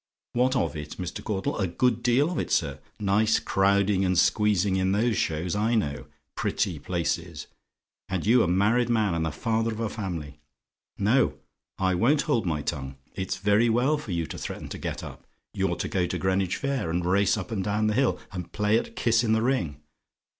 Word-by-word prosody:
"WHAT 125 +2 +2
OF 125 - 0
IT, 75 -1 -7
MR. 90 -2 -5
CAUDLE? 95 -1 -2
"A 95 - +1
good 120 +6 +1
deal 130 +7 +3
of 175 - -2
it, - - -2
sir. - - 0 0.2
Nice 105 +2 +3
crowding 100 0 +2
and 90 -1 +1
squeezing 105 0 +3
in 95 0 +1
those 110 +2 +2
shows, 85 +1 -1
I 110 +3 +1
know. 75 -10 -1 0.3
Pretty 90 -7 -1
places! 85 -2 -3 0.6
And 95 -1 -2
you 120 +3 +5
a - - +2
married 105 +7 +2
man 110 -5 +2
and 85 -1 0
the 80 - -1
father 115 +7 0
of 110 - -6
a 115 -2 -1
family. 85 -9 -5 0.6
No: 110 +7 +2 0.4
I 95 -1 +1
won't 130 +11 +3
hold 120 - 0
my 75 -3 -1
tongue. 65 -4 -4 0.2
It's 95 -1 -3
very 105 +4 +3
well 130 +7 +2
for 120 -9 -7
you 85 -2 -1
to - - -7
threaten - - -6
to - - -6
get - - -4
up. - - -10 0.3
You're - - 0
to - - -3
go 90 -2 0
to - - -3
Greenwich 95 -1 0
Fair, 140 - -2
and 85 +1 -1
race 100 +3 +3
up 100 +2 -6
and 100 -4 -1
down 105 +2 0
the 105 - +2
hill, 130 +2 +2
and 90 -3 -6
play 105 +1 +2
at - - -8
kiss 115 0 +2
in 110 -2 +2
the 110 0 +2
ring. 85 - -1
100 Hz, 205 wpm, -26 LUFS, 90-115 Hz, 0.6 s, you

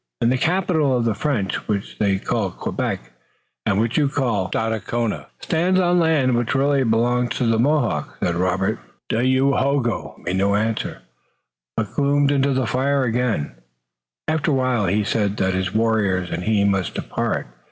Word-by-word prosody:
"And 115 - +2
the 130 - +2
capital 160 -6 +2
of 120 - 0
the 115 - +2
French, 105 -4 -2
which 100 -2 -3
they 100 -2 +2
call 105 0 -1
Quebec, - - -4 0.6
and 100 - +2
which 115 +6 +1
you 145 -2 +2
call 115 -10 -1
Stadacona, 115 0 -2
stands 180 +3 +1
on 175 -1 +3
land 150 -7 +3
which 120 +2 0
really 140 0 +2
belongs 120 +1 +1
to 125 - 0
the 115 -1 +2
Mohawks," 150 +5 0
said 85 - 0
Robert 95 +2 0 0.3
meaningly. 130 +3 +2
Dayohogo 135 -3 0
made 90 +2 -1
no 100 +1 +2
answer, 110 - -2 0.7
but 110 -2 -2
gloomed 145 0 +2
into 140 0 +2
the 130 -1 +1
fire 130 +5 +1
again. 115 - 0 0.8
After 155 0 0
a 145 - +2
while 130 -6 +1
he 105 +4 +1
said 105 -1 0
that 95 0 +1
his 95 0 -1
warriors 105 -5 +1
and 85 +2 -3
he 105 -2 +2
must 95 -3 0
depart. - - -2
115 Hz, 165 wpm, -21 LUFS, 100-140 Hz, 0.8 s, on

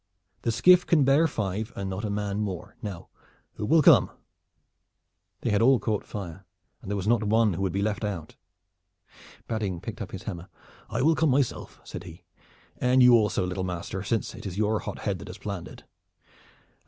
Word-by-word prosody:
The 115 - 0
skiff 180 +9 +6
can 160 -5 +3
bear 140 +5 +4
five 105 - -3
and 100 - -4
not 95 +2 -4
a 105 - -2
man 100 0 -2
more. 100 -1 -4
Now, 100 -7 -7 0.4
who 105 - -4
will 160 +4 +5
come?" - - +7 1.3
They 120 - -1
had 105 +1 +2
all 130 +3 +6
caught 110 -3 -2
fire, 95 -2 -7 0.4
and - - -9
there 105 - -1
was 100 -1 -3
not 115 0 +3
one 110 -1 +3
who 85 - -4
would 95 -2 0
be 100 +2 -1
left 105 +1 -1
out. 95 -7 -4 1.1
Badding 105 -6 -2
picked 105 +5 -7
up 100 - -5
his 95 +1 -8
hammer. 90 -2 -6 0.4
"I 115 +4 -1
will 160 +3 +5
come 160 -1 +2
myself," 135 -1 -1
said - - -8
he, 85 -1 -12 0.6
"and 125 +1 +4
you 125 0 +8
also, 105 -5 +3
little 90 +1 -3
master, 90 +1 -4
since 110 +2 -2
it - - -8
is 95 0 -6
your 110 0 +1
hot - - -6
head - - -2
that - - -9
has - - -8
planned 100 -4 -5
it. - - -13
105 Hz, 195 wpm, -27 LUFS, 95-115 Hz, 1.3 s, you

